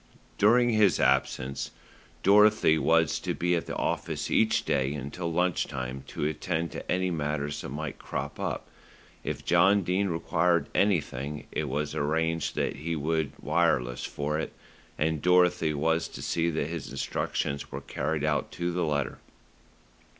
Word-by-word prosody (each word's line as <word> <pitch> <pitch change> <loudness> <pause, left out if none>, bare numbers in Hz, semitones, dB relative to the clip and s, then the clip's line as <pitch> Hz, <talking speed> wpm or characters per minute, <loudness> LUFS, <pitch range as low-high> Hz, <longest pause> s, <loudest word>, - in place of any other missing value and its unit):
During 120 +4 +5
his 105 -4 +4
absence, 65 +2 +1 0.5
Dorothy 105 -5 +5
was 80 -1 +3
to - - -3
be 90 0 +1
at 85 - -2
the - - -4
office - - -2
each 110 0 +3
day 70 -2 +1
until 75 +5 -4
lunch 90 +1 +1
time 65 0 -5
to - - -3
attend 80 +2 -2
to - - -6
any 95 0 +1
matters 75 -2 -2
that - - -6
might 75 +1 -5
crop - - -5
up. - - -3 0.6
If - - -4
John 100 0 +4
Dene 95 +3 +1
required 85 0 +1
anything, 75 -7 0
it 75 -2 -2
was 75 +2 -2
arranged 80 +2 0
that - - -1
he 80 +3 -3
would 80 0 -1
wireless 75 -6 +1
for 75 +2 -2
it, - - -4 0.4
and 80 -1 0
Dorothy 90 -3 +4
was 80 +3 +1
to - - -9
see 85 0 0
that 80 -3 -1
his 80 -1 -5
instructions 70 +1 -2
were - - -5
carried 75 -2 -2
out 75 -1 0
to 85 0 -2
the 90 0 -1
letter. 70 -4 -1
80 Hz, 155 wpm, -28 LUFS, 75-90 Hz, 0.6 s, During